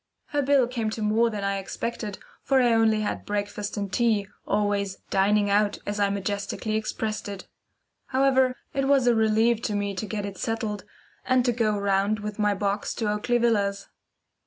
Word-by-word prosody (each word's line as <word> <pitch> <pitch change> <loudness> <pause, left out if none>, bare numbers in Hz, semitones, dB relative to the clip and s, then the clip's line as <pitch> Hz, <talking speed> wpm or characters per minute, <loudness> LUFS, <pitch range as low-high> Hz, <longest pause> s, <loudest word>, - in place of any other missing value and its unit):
Her 290 - 0
bill 275 -2 +4
came 235 -3 -2
to - - -4
more 220 +2 +3
than 210 -3 -4
I 200 0 0
expected, 210 +1 -4 0.2
for 270 -1 +2
I 240 -2 +4
only 220 -1 +3
had 210 - -3
breakfast 205 0 -3
and 200 -2 -3
tea, 220 -3 +2 0.2
always 200 -2 0
"dining 205 +1 +3
out" 205 0 +2
as 205 0 -3
I 200 -1 +3
majestically 200 +2 -2
expressed 215 -1 -3
it. 200 -2 -8 0.6
However, 260 -1 +3 0.2
it 275 0 0
was 275 -2 +4
a 240 - +5
relief 220 +1 +3
to 210 - -2
me 200 0 -1
to 195 +3 -4
get 205 -1 -3
it 195 -2 -7
settled, 220 -2 -3 0.4
and 255 -1 +2
to 245 - +3
go 220 -3 +1
round 200 +1 +1
with 210 0 -6
my 205 -1 +2
box 200 +1 -2
to 215 -3 -1
Oakley 210 +3 +1
Villas. 205 -4 0
210 Hz, 180 wpm, -26 LUFS, 200-235 Hz, 0.6 s, a